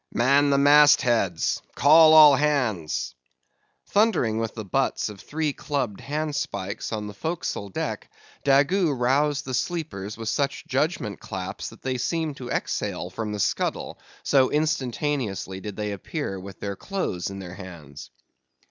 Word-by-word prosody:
"Man 140 Hz, +4 st, +3 dB
the 140 Hz, -, +3 dB
mast 145 Hz, 0 st, +6 dB
heads! 105 Hz, -, +1 dB
Call 155 Hz, +3 st, +7 dB
all 150 Hz, -3 st, +9 dB
hands!" 125 Hz, -, 0 dB, 0.7 s
Thundering 190 Hz, -, +2 dB
with 115 Hz, -1 st, -3 dB
the 110 Hz, -2 st, -6 dB
butts 95 Hz, -, 0 dB
of 105 Hz, -2 st, -10 dB
three 155 Hz, -1 st, -2 dB
clubbed 135 Hz, -10 st, -3 dB
handspikes 145 Hz, -9 st, -3 dB
on 105 Hz, -2 st, -3 dB
the 105 Hz, -, -7 dB
forecastle 160 Hz, -, -4 dB
deck, -, -, -4 dB, 0.3 s
Daggoo 145 Hz, +5 st, +3 dB
roused 145 Hz, +4 st, +1 dB
the 130 Hz, -, -5 dB
sleepers 125 Hz, -, -3 dB
with 115 Hz, -1 st, -6 dB
such 140 Hz, +4 st, -1 dB
judgment 130 Hz, -, -1 dB
claps -, -, -6 dB
that -, -, -16 dB
they 130 Hz, -1 st, -2 dB
seemed 160 Hz, +1 st, -2 dB
to 125 Hz, -1 st, -7 dB
exhale 90 Hz, -, -3 dB
from 110 Hz, +2 st, -4 dB
the 105 Hz, -, -4 dB
scuttle, -, -, -1 dB, 0.2 s
so 135 Hz, -2 st, +3 dB
instantaneously 130 Hz, -, -2 dB
did 105 Hz, 0 st, -6 dB
they 105 Hz, 0 st, -3 dB
appear 100 Hz, -, -4 dB
with 95 Hz, +1 st, -10 dB
their 100 Hz, -1 st, -4 dB
clothes 140 Hz, -, -3 dB
in 100 Hz, -, -7 dB
their 90 Hz, -3 st, -8 dB
hands. 85 Hz, -7 st, -10 dB
130 Hz, 150 wpm, -25 LUFS, 100-150 Hz, 0.7 s, all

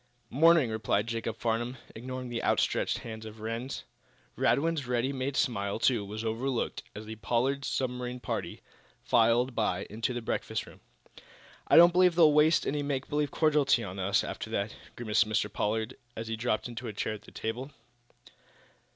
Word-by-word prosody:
"'Morning," 155 Hz, -2 st, +5 dB
replied 110 Hz, -1 st, 0 dB
Jacob 115 Hz, -1 st, -3 dB
Farnum, 120 Hz, +2 st, -1 dB, 0.2 s
ignoring 130 Hz, +2 st, -6 dB
the 120 Hz, -1 st, -3 dB
outstretched -, -, +1 dB
hand 110 Hz, -1 st, -7 dB
of 110 Hz, 0 st, -10 dB
Rhinds. 115 Hz, +4 st, -4 dB, 0.5 s
Radwin's 155 Hz, -2 st, +1 dB
ready 125 Hz, +2 st, 0 dB
made 135 Hz, +1 st, -2 dB
smile, 100 Hz, -4 st, 0 dB
too, 115 Hz, -2 st, +2 dB
was 105 Hz, +2 st, -6 dB
overlooked, 115 Hz, +3 st, -2 dB
as 110 Hz, -, -7 dB
the 110 Hz, +1 st, -7 dB
Pollard 130 Hz, +5 st, 0 dB
submarine 125 Hz, -2 st, -2 dB
party -, -, -4 dB, 0.4 s
filed 120 Hz, +3 st, +3 dB
by 110 Hz, -2 st, 0 dB
into 110 Hz, +4 st, -2 dB
the 120 Hz, -1 st, -3 dB
breakfast -, -, -2 dB
room. -, -, -15 dB, 0.9 s
"I -, -, +6 dB
don't 170 Hz, +1 st, +9 dB
believe 180 Hz, -1 st, +5 dB
they'll 160 Hz, -3 st, +6 dB
waste 155 Hz, +2 st, +4 dB
any 145 Hz, +1 st, -1 dB
make 140 Hz, -2 st, -2 dB
believe 150 Hz, -1 st, 0 dB
cordiality 145 Hz, -6 st, +3 dB
on 95 Hz, -1 st, -6 dB
us, 100 Hz, +3 st, +2 dB
after -, -, -5 dB
that," 105 Hz, -1 st, -2 dB, 0.2 s
grimaced 110 Hz, -2 st, +1 dB
Mr. 110 Hz, +1 st, 0 dB
Pollard, 110 Hz, +3 st, -1 dB, 0.2 s
as 115 Hz, 0 st, -5 dB
he 115 Hz, -, -2 dB
dropped 115 Hz, 0 st, -1 dB
into 120 Hz, 0 st, -6 dB
a 110 Hz, -, -5 dB
chair 105 Hz, -, -2 dB
at 105 Hz, 0 st, -10 dB
a -, -, -12 dB
table. 120 Hz, +5 st, -4 dB
120 Hz, 170 wpm, -30 LUFS, 110-135 Hz, 0.9 s, don't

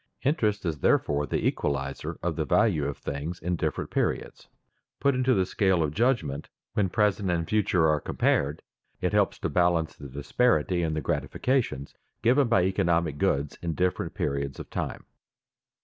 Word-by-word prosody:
Interest 110 Hz, -, +1 dB
is 80 Hz, -4 st, -2 dB
therefore 75 Hz, +1 st, +2 dB
the -, -, -1 dB
equalizer 70 Hz, -1 st, -2 dB
of -, -, -1 dB
the -, -, 0 dB
value 85 Hz, -10 st, +2 dB
of 70 Hz, 0 st, -3 dB
things 75 Hz, +5 st, -4 dB
in 90 Hz, +2 st, -1 dB
different 80 Hz, -2 st, -2 dB
periods. -, -, -2 dB, 0.5 s
Put 140 Hz, -, +3 dB
into 130 Hz, 0 st, +2 dB
the 95 Hz, -2 st, +2 dB
scale 95 Hz, -3 st, +2 dB
of 75 Hz, -1 st, -2 dB
judgment 110 Hz, -, 0 dB, 0.2 s
when 100 Hz, -3 st, +1 dB
present 105 Hz, -1 st, +1 dB
and 85 Hz, -2 st, 0 dB
future 105 Hz, -6 st, +2 dB
are 75 Hz, -1 st, +2 dB
compared, 75 Hz, +3 st, 0 dB, 0.4 s
it -, -, -1 dB
helps -, -, +2 dB
to -, -, -2 dB
balance 85 Hz, -2 st, +1 dB
the 70 Hz, -, -10 dB
disparity 90 Hz, -, +1 dB
in 80 Hz, -2 st, -1 dB
the 80 Hz, -, -1 dB
gratifications 110 Hz, -, -1 dB, 0.3 s
given 130 Hz, +3 st, +4 dB
by 105 Hz, -6 st, +3 dB
economic 85 Hz, -5 st, +1 dB
goods 75 Hz, -7 st, 0 dB
in 85 Hz, -2 st, -2 dB
different 90 Hz, -1 st, -1 dB
periods 70 Hz, -1 st, -2 dB
of -, -, -9 dB
time. -, -, -4 dB
85 Hz, 165 wpm, -27 LUFS, 75-105 Hz, 0.5 s, given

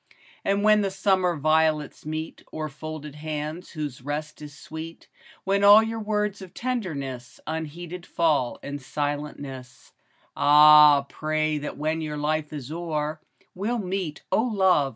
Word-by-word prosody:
And 200 Hz, +1 st, +1 dB
when 215 Hz, 0 st, +5 dB
the 200 Hz, -, 0 dB
summer 190 Hz, -2 st, +1 dB
violets 155 Hz, 0 st, +1 dB
meet 155 Hz, +1 st, -5 dB
O'er 155 Hz, -1 st, -4 dB
folded 150 Hz, 0 st, -7 dB
hands 155 Hz, +2 st, -5 dB
whose 145 Hz, -5 st, -5 dB
rest 150 Hz, +3 st, -5 dB
is 145 Hz, -1 st, -10 dB
sweet, 160 Hz, +2 st, -9 dB, 0.4 s
When 200 Hz, +1 st, +1 dB
all 205 Hz, +2 st, +9 dB
your 225 Hz, 0 st, -3 dB
words 210 Hz, -2 st, -1 dB
of 190 Hz, -1 st, -11 dB
tenderness 145 Hz, -, -4 dB
Unheeded 165 Hz, +3 st, -6 dB
fall 150 Hz, -7 st, +1 dB
in 145 Hz, 0 st, -5 dB
silentness, 145 Hz, -2 st, -5 dB, 0.2 s
— -, -, -37 dB
Ah, 150 Hz, -1 st, +7 dB
pray 155 Hz, 0 st, -1 dB
that 145 Hz, -, -6 dB
when 155 Hz, +2 st, -1 dB
your 150 Hz, -1 st, -4 dB
life 150 Hz, 0 st, -1 dB
is 145 Hz, -2 st, -7 dB
o'er, 155 Hz, -2 st, -3 dB, 0.3 s
We'll 215 Hz, +6 st, -2 dB
meet, 185 Hz, -6 st, -3 dB
O -, -, +3 dB
love 190 Hz, -, +3 dB
155 Hz, 145 wpm, -25 LUFS, 150-185 Hz, 0.4 s, all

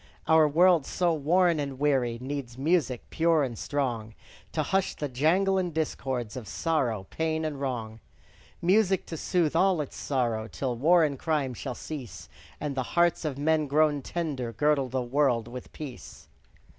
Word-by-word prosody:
Our 160 Hz, -1 st, +6 dB
world, 170 Hz, 0 st, +4 dB
so 175 Hz, -2 st, +1 dB
warn 170 Hz, +2 st, +2 dB
and 140 Hz, -2 st, -4 dB
weary, 130 Hz, -5 st, +1 dB
Needs 130 Hz, -2 st, -5 dB
music, 140 Hz, -4 st, +1 dB
pure 165 Hz, -2 st, +3 dB
and 125 Hz, -4 st, -3 dB
strong, 115 Hz, -4 st, -3 dB, 0.4 s
To 155 Hz, -, 0 dB
hush 190 Hz, +5 st, 0 dB
the 150 Hz, -, -3 dB
jangle 175 Hz, +9 st, +2 dB
and 180 Hz, -2 st, -1 dB
discords 130 Hz, -7 st, -3 dB
Of 125 Hz, -5 st, -7 dB
sorrow, 120 Hz, -, -1 dB
pain, 160 Hz, 0 st, -1 dB
and 145 Hz, -3 st, -4 dB
wrong. 115 Hz, -5 st, -4 dB, 0.6 s
Music 190 Hz, +1 st, +3 dB
to 165 Hz, -, -6 dB
soothe 165 Hz, -1 st, 0 dB
all 185 Hz, 0 st, +3 dB
its 145 Hz, -, -4 dB
sorrow, 120 Hz, -5 st, -1 dB
Till 125 Hz, +1 st, -3 dB
war 165 Hz, +7 st, +4 dB
and 140 Hz, -4 st, -1 dB
crime 150 Hz, -5 st, 0 dB
shall 125 Hz, +1 st, -5 dB
cease; 140 Hz, -7 st, -8 dB, 0.3 s
And 145 Hz, -1 st, -3 dB
the 135 Hz, -, -1 dB, 0.2 s
hearts 170 Hz, -1 st, +3 dB
of 145 Hz, -3 st, -2 dB
men 155 Hz, +1 st, +1 dB
grown 150 Hz, 0 st, +2 dB
tender 140 Hz, -6 st, -3 dB
Girdle 140 Hz, +2 st, +1 dB
the 130 Hz, 0 st, -1 dB
world 120 Hz, -3 st, +1 dB
with 125 Hz, +1 st, -9 dB
peace. 140 Hz, -5 st, -9 dB
145 Hz, 165 wpm, -28 LUFS, 125-160 Hz, 0.6 s, Our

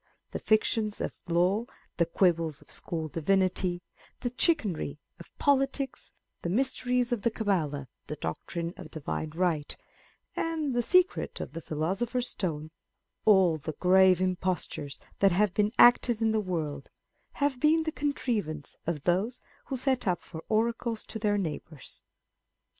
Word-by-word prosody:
The -, -, -3 dB
fictions 215 Hz, -1 st, +1 dB
of -, -, -2 dB, 0.2 s
law, 180 Hz, +6 st, +2 dB, 0.3 s
the 170 Hz, -, +3 dB
quibbles 165 Hz, -4 st, +2 dB
of -, -, -16 dB
school 160 Hz, -2 st, -4 dB
divinity, 180 Hz, +2 st, +1 dB, 0.4 s
the 245 Hz, -1 st, -2 dB
chicanery 210 Hz, -, +1 dB, 0.2 s
of 170 Hz, -, -13 dB
politics, 275 Hz, -1 st, 0 dB, 0.3 s
the 170 Hz, -, -2 dB
mysteries 250 Hz, +2 st, +1 dB
of 240 Hz, -4 st, 0 dB
the 235 Hz, -, +2 dB
Cabala, 165 Hz, -, -1 dB, 0.2 s
the 150 Hz, -, -4 dB
doctrine 170 Hz, +2 st, -4 dB
of -, -, -9 dB
Divine 155 Hz, 0 st, -4 dB
Right, 165 Hz, -4 st, 0 dB, 0.6 s
and 315 Hz, -4 st, -1 dB
the 240 Hz, -, +2 dB
secret 365 Hz, -, +2 dB
of -, -, -5 dB
the 165 Hz, -, -5 dB
philosopher's 195 Hz, -, -1 dB
stone, 160 Hz, -6 st, -2 dB
â€" 155 Hz, -, -10 dB, 0.6 s
all 190 Hz, -6 st, +5 dB
the 155 Hz, +1 st, -5 dB
grave 185 Hz, +1 st, +5 dB
impostures 185 Hz, -6 st, -2 dB, 0.2 s
that 195 Hz, -2 st, +5 dB
have 200 Hz, 0 st, +2 dB
been 210 Hz, 0 st, +2 dB
acted 240 Hz, -1 st, +6 dB
in 225 Hz, -1 st, +2 dB
the 220 Hz, -, +2 dB
world, 155 Hz, -7 st, -3 dB, 0.4 s
have 285 Hz, -3 st, 0 dB
been 315 Hz, +3 st, +4 dB
the 315 Hz, -, -2 dB
contriv 265 Hz, -, -1 dB
ance 150 Hz, -2 st, -8 dB
of 155 Hz, -4 st, -2 dB
those 205 Hz, +8 st, +1 dB, 0.3 s
who 265 Hz, -, -3 dB
set 260 Hz, -3 st, 0 dB
up 180 Hz, -1 st, 0 dB
for 160 Hz, -1 st, -9 dB
oracles 230 Hz, +1 st, 0 dB
to 220 Hz, -, -6 dB
their 205 Hz, -1 st, +2 dB
neighbours. 155 Hz, -5 st, -6 dB
195 Hz, 150 wpm, -29 LUFS, 165-240 Hz, 0.6 s, acted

